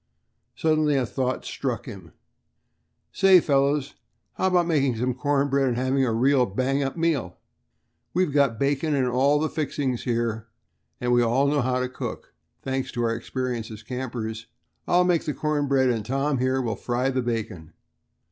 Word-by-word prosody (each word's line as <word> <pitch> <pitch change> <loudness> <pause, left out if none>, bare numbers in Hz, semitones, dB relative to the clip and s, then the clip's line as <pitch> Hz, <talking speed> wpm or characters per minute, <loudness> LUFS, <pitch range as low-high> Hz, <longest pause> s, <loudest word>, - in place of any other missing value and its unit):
Suddenly 155 -2 +2
a 130 -2 +1
thought 130 +1 -2
struck 125 -5 -3
him. 95 -6 -10 1.0
"Say, 190 -2 +6
fellows," 140 -1 +1
he - - -20
called, - - -38 0.3
"how 190 - 0
about 180 -2 +3
making 140 -7 +1
some 125 +3 -1
cornbread 140 +1 +1
and 120 -2 0
having 130 +2 +1
a 125 - +1
real 125 +2 +3
bang 130 +7 0
up 135 +3 -3
meal? 155 - -1 0.7
We've 180 -3 +1
got 140 -6 +3
bacon 145 +4 0
and 135 -2 +1
all 135 +4 +3
the 155 +2 0
fixings 145 -5 -2
here, 115 -2 -1 0.5
and 125 0 0
we 120 - +4
all 120 +4 +2
know 145 0 +2
how 125 +1 0
to 125 - -1
cook, 125 - -7 0.3
thanks 130 0 -2
to 120 - -1
our 115 -1 +1
experience 120 -1 -4
as 110 0 -10
campers. 115 -2 -5 0.4
I'll 180 +1 +4
make 180 -2 +1
the 150 - -2
corn 150 -2 -1
bread, 135 -2 +3
and 115 -3 -2
Tom 135 +4 -1
here 130 +1 +1
will 115 -2 -2
fry 125 +2 -1
the 130 -1 0
bacon." 110 -9 -4
130 Hz, 175 wpm, -25 LUFS, 120-145 Hz, 1.0 s, Say